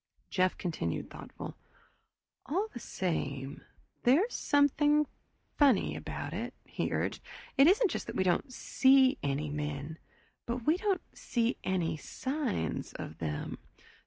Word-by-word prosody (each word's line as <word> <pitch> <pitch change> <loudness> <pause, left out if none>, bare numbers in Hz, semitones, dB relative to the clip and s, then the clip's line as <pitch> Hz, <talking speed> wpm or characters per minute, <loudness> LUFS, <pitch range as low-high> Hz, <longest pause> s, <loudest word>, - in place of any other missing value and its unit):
Jeff 185 0 +2
continued 155 - -3
thoughtful. - - -8 0.9
"All 385 +10 0
the 240 - -6
same, 140 - -3 0.4
there's 325 - +4
something 295 +1 +3 0.5
funny 270 -9 +4
about - - -5
it," - - -4
he - - -2
urged. - - -1 0.3
"It 275 +2 +7
isn't 405 +3 +5
just - - -3
that - - -5
we 190 - +2
don't 185 +9 +1
see 265 +2 +4
any 145 +1 -1
men 150 +1 -4 0.5
but 240 0 -3
we 315 +3 +4
don't 390 -2 0
see 235 0 0
any 175 -4 0
signs 255 - -2
of 80 - -7
them. 75 -2 -3
235 Hz, 130 wpm, -31 LUFS, -, 0.9 s, It